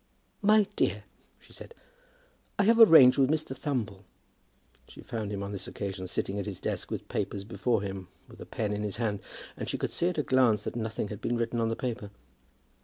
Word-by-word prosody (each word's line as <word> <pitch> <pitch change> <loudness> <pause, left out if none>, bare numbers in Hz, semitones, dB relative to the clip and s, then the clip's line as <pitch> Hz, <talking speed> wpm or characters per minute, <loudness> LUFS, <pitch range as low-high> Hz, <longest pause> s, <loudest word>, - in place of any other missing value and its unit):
"My 210 0 +5
dear," - - 0 0.4
she - - -19
said, 470 - -12 0.8
"I 200 - +3
have 230 +3 +4
arranged 145 - +9
with 135 -1 +4
Mr. 155 -3 -1
Thumble." 120 -9 -3 0.8
She - - -13
found 110 -3 -5
him 100 -1 -3
on 100 - -5
this 100 -2 -5
occasion 95 -2 -5
sitting 100 +2 -2
at 100 - -4
his 100 -3 -5
desk - - -3
with - - -5
papers 100 0 -3
before 110 +1 -1
him, 95 -2 -5 0.2
with - - -14
a - - -9
pen 105 -2 -2
in 105 - -3
his 105 -1 -3
hand; 110 -4 -1 0.3
and - - -5
she - - -2
could - - -3
see 175 - +1
at 180 - -5
a 150 - +1
glance 125 -6 +3
that - - -5
nothing 110 -2 -3
had 105 - -7
been 120 - -1
written 115 0 -1
on 115 - +1
the 115 - -1
paper. 120 -4 -4
110 Hz, 210 wpm, -29 LUFS, 100-130 Hz, 0.8 s, arranged